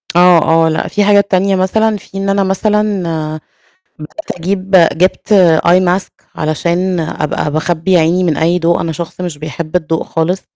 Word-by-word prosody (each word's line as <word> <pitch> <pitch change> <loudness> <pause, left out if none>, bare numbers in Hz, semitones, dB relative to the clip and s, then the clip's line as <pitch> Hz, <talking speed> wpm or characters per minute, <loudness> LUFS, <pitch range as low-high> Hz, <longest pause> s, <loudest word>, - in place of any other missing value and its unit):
آه، 175 -2 +5 0.2
آه، - - +2
لأ 160 - -2
في 205 - 0
حاجات 200 0 +3
تانية 190 +1 +2
مثلًا، 215 +3 0
في 195 - -12
إن 195 0 -2
أنا 195 0 +1
مثلًا، 205 -1 0
آآ 155 -1 -4 0.7
بدأت 320 - -8
أجيب 190 +2 -3 0.2
جبت 185 +4 0 0.3
eye 180 +2 +5 0.2
mask - - -11 0.2
علشان 170 +4 -1
أبقى 150 -1 -3
باخبي 170 +3 0
عيني 170 +3 +1
من 160 -5 0
أي 170 +2 +1
ضوء، 170 +1 +1
أنا 165 - -3
شخص 170 +3 -7
مش 170 -5 -5
بيحب 155 +2 -7
الضوء 160 -2 -1
خالص. 170 +4 -2
180 Hz, 170 wpm, -14 LUFS, 160-195 Hz, 0.7 s, آه